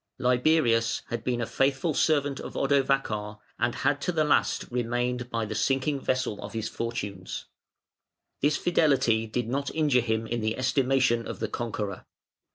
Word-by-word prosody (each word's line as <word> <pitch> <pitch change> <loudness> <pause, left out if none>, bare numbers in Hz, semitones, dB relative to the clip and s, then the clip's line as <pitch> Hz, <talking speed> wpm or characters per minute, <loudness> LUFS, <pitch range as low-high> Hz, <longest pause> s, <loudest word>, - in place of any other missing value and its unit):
Liberius 125 -2 +2
had 120 -1 -3
been 120 -2 -1
a - - 0
faithful 135 +6 +1
servant 145 -2 +1
of - - -7
Odovacar; 135 -7 +1 0.2
and 120 +1 +1
had 145 +1 0
to 180 - 0
the 160 -3 +2
last 150 - +2
remained 120 0 -1
by 115 -2 -1
the 105 - -4
sinking 135 +5 +1
vessel 130 -5 -1
of 100 - -7
his 110 -1 -2
fortunes. 100 -5 -5 1.0
This 145 +1 +3
fidelity 130 -10 +2
did 115 +1 -2
not 140 +3 -1
injure 145 -6 +3
him 110 -1 -1
in 120 +1 -2
the 110 +1 -1
estimation 130 -2 +2
of - - -5
the 110 - -1
conqueror. 105 -4 -4
125 Hz, 160 wpm, -27 LUFS, 115-135 Hz, 1.0 s, This